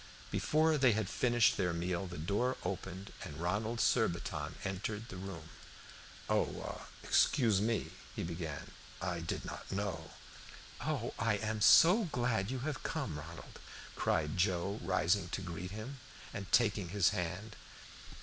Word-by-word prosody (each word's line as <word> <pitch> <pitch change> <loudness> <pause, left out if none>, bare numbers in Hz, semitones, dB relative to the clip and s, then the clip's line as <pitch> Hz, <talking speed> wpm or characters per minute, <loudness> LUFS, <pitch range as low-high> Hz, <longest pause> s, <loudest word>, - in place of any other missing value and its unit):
Before 155 0 +3
they 130 -4 +6
had 110 -2 0
finished 120 +1 +3
their 90 -3 +1
meal 90 +2 -1
the 90 - -7
door 100 +11 0
opened, 95 +1 -4
and 75 - -7
Ronald 105 +7 -1
Surbiton 85 -8 +1
entered 105 +4 -3
the - - -7
room. 90 -4 -7 0.8
"Oh - - -1 0.2
excuse 110 -8 +4
me," 115 +1 0 0.2
he - - -2
began, 80 -4 -5 0.3
"I 90 -3 -2
did 85 0 -3
not - - -7
know" 95 -6 -2 0.7
"Oh, 145 -6 -2
I 115 -2 +2
am 110 +1 -2
so 185 - +8
glad 120 - 0
you 130 -1 -3
have 145 +1 -3
come, 135 - -3
Ronald," 85 +2 -10 0.4
cried 75 +2 +1
Joe, 95 +2 +1
rising 90 +6 +2
to - - -3
greet 90 0 -5
him, 110 +7 -7 0.3
and 100 -2 -6
taking 105 -6 +3
his 100 0 +4
hand. 90 +2 -3
100 Hz, 140 wpm, -34 LUFS, 85-115 Hz, 0.8 s, so